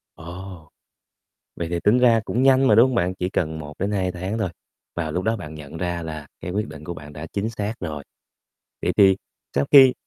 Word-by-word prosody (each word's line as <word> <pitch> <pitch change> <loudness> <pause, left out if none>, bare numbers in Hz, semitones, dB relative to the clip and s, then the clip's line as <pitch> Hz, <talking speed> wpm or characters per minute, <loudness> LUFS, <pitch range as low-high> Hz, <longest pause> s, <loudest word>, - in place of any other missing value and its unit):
Ồ! 85 -1 -9 0.9
Vậy 85 - -3
thì 85 0 -2
tính 110 +5 +5
ra 120 -2 +5
cũng 125 - 0
nhanh 135 0 +5
mà, - - +6
đúng 115 +4 +7
hông 130 - -2
bạn? 90 -4 +1
Chỉ 90 0 -2
cần 80 -4 -1
1-2 90 +5 -2
tháng 95 +5 -3
thôi, 110 - 0 0.5
và 80 -2 -2
lúc 90 +4 -2
đó 110 +1 +1
bạn 80 -7 -8
nhận 75 0 -9
ra 85 -1 -2
là 80 -2 -6
cái 85 - -5
quyết 105 +4 -2
định 75 0 -10
của 85 - -5
bạn 75 -2 -10
đã 75 +2 -7
chính 100 +2 -1
xác 105 -1 -3
rồi. 75 -5 -5 0.8
Vậy - - +1
thì 95 -2 +7 0.4
sau 70 +1 +2
khi 135 -3 +9
90 Hz, 215 wpm, -23 LUFS, 80-105 Hz, 0.9 s, khi